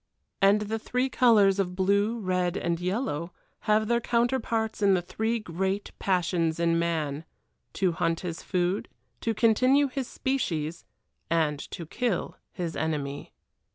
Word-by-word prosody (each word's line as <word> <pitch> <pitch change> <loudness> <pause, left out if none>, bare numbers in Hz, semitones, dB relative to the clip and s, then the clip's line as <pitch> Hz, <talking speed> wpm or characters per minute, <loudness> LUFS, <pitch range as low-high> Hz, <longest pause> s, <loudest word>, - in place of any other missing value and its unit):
And 200 +2 +5
the 220 +2 -2
three 250 +4 -1
colors 210 -7 +4
of 180 -2 -1
blue, 200 +4 +2
red, 185 -3 0
and 170 -1 -1
yellow 180 - -2 0.4
have 215 0 +4
their 235 +1 +2
counterparts 235 -2 0
in 200 -2 +5
the 180 - +1
three 220 +6 -1
great 190 0 -2
passions 170 -3 +1
in 170 0 +2
man 160 -3 -1 0.5
to 185 -2 +1
hunt 165 0 -1
his 170 -2 -5
food, 180 +1 -1 0.3
to 225 -1 -1
continue 255 +6 +4
his 260 -1 -3
species, 170 - -2 0.4
and 155 -3 +1
to 170 - -6
kill 230 +4 -2 0.2
his 170 -2 -4
enemy. 145 -3 -3
190 Hz, 140 wpm, -27 LUFS, 170-225 Hz, 0.5 s, And